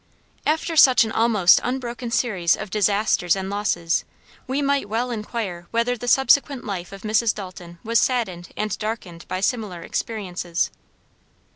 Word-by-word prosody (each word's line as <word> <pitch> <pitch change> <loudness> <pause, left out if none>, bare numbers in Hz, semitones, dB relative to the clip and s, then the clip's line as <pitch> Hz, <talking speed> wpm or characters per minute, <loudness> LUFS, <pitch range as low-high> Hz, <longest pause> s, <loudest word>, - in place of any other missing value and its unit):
After 320 +2 0
such 255 -6 +7
an 220 - -3
almost 220 -6 +4
unbroken 245 -1 -3
series 215 -8 +1
of 210 -3 -7
disasters 200 -3 +2
and 190 0 -4
losses, 175 -5 0 0.4
we 265 +2 -1
might 280 -6 0
well 240 +3 -1
inquire 210 -6 -4
whether 235 +2 0
the 245 +1 -7
subsequent 270 +1 +3
life 185 -5 -5
of 195 -1 -10
Mrs. 220 +1 +2
Dalton 180 -3 -9
was 230 +1 +2
saddened 190 -9 -1
and 215 -2 -1
darkened 210 -6 -5
by 185 - -3
similar 200 -6 -2
experiences. 180 -6 -3
215 Hz, 145 wpm, -23 LUFS, 185-240 Hz, 0.4 s, such